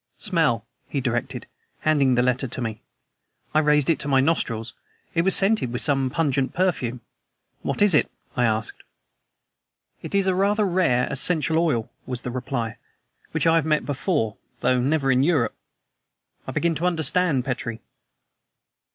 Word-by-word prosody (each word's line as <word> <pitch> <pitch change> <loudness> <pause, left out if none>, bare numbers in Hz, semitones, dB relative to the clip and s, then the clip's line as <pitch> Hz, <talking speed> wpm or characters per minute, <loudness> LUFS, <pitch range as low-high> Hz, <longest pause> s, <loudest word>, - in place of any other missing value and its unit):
"Smell!" 160 - +1 0.2
he 140 - -2
directed, 120 -3 -2 0.4
handing 140 -5 +3
the 120 - +3
letter 125 +1 +1
to 125 - -7
me. 110 -3 -4 0.7
I 155 - +4
raised 150 -2 +3
it 165 - +2
to - - -4
my 135 -2 +4
nostrils. 115 -7 0 0.4
It 165 - +2
was 190 +2 +3
scented 200 - +3
with 125 - -1
some 135 -2 +1
pungent 135 -3 0
perfume. 135 -10 0 0.6
"What - - 0
is 205 -3 +5
it?" 150 - +3 0.3
I 125 - +2
asked. 110 -1 -1 1.2
"It - - -5
is 195 -1 +3
a 190 - +2
rather 205 +3 +2
rare 170 -10 +2
essential 160 +3 +1
oil," 125 -9 0 0.2
was 125 -2 -4
the 125 - -4
reply, 120 -3 -3 0.5
"which - - -1
I 165 0 +5
have 160 - +1
met 155 -1 +2
with - - -12
before, 140 - -1 0.2
though 125 0 +2
never 135 0 +1
in 130 0 +3
Europe. 145 -5 +2 0.9
I - - -3
begin 170 0 +1
to 170 +4 0
understand, 165 -5 +1
Petrie." 120 -3 -3
140 Hz, 160 wpm, -24 LUFS, 125-165 Hz, 1.2 s, is